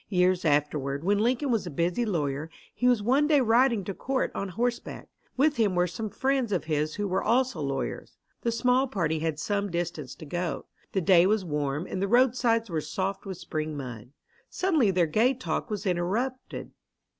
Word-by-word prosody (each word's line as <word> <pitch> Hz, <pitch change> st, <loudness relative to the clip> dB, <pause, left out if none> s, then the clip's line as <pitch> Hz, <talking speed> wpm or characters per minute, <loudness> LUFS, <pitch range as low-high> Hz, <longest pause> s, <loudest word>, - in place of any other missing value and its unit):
Years 180 Hz, -1 st, +2 dB
afterward, 145 Hz, -1 st, 0 dB
when 200 Hz, +3 st, +2 dB
Lincoln 250 Hz, +5 st, +1 dB
was 220 Hz, -5 st, 0 dB
a -, -, -3 dB
busy 175 Hz, -, 0 dB
lawyer, 150 Hz, -5 st, -2 dB, 0.2 s
he 250 Hz, -, 0 dB
was 245 Hz, -4 st, +3 dB
one 270 Hz, +6 st, +3 dB
day 300 Hz, -2 st, +5 dB
riding 235 Hz, -2 st, +3 dB
to 195 Hz, -, -4 dB
court 265 Hz, +6 st, -1 dB
on 195 Hz, -, -3 dB
horseback. 240 Hz, +5 st, -3 dB, 0.3 s
With 290 Hz, +1 st, +3 dB
him 210 Hz, -5 st, +2 dB
were 175 Hz, 0 st, +3 dB
some 215 Hz, +5 st, -4 dB
friends 265 Hz, 0 st, 0 dB
of 185 Hz, -, 0 dB
his 155 Hz, -1 st, -1 dB
who 205 Hz, 0 st, -2 dB
were 185 Hz, 0 st, 0 dB
also 245 Hz, -6 st, +1 dB
lawyers. 135 Hz, -1 st, -4 dB, 0.2 s
The 235 Hz, -, 0 dB
small 250 Hz, +3 st, +2 dB
party 165 Hz, -9 st, -1 dB
had 160 Hz, -1 st, -1 dB
some 200 Hz, +4 st, -1 dB
distance 165 Hz, -6 st, -4 dB
to -, -, -10 dB
go. 170 Hz, -1 st, -3 dB, 0.3 s
The 190 Hz, -, +1 dB
day 180 Hz, 0 st, +5 dB
was 210 Hz, -2 st, +1 dB
warm 150 Hz, 0 st, -2 dB
and 190 Hz, -, -4 dB
the 200 Hz, -, +1 dB
roadsides 235 Hz, -1 st, +3 dB
were 165 Hz, -5 st, -2 dB
soft 190 Hz, +6 st, -3 dB
with 190 Hz, -2 st, -5 dB
spring 155 Hz, -2 st, -4 dB
mud. 125 Hz, -4 st, -7 dB, 0.4 s
Suddenly 320 Hz, -, +2 dB
their 180 Hz, -2 st, +3 dB
gay 225 Hz, -, +2 dB
talk 255 Hz, 0 st, -3 dB
was 210 Hz, -1 st, -4 dB
interrupted. 200 Hz, +9 st, -2 dB
195 Hz, 190 wpm, -27 LUFS, 160-240 Hz, 0.4 s, day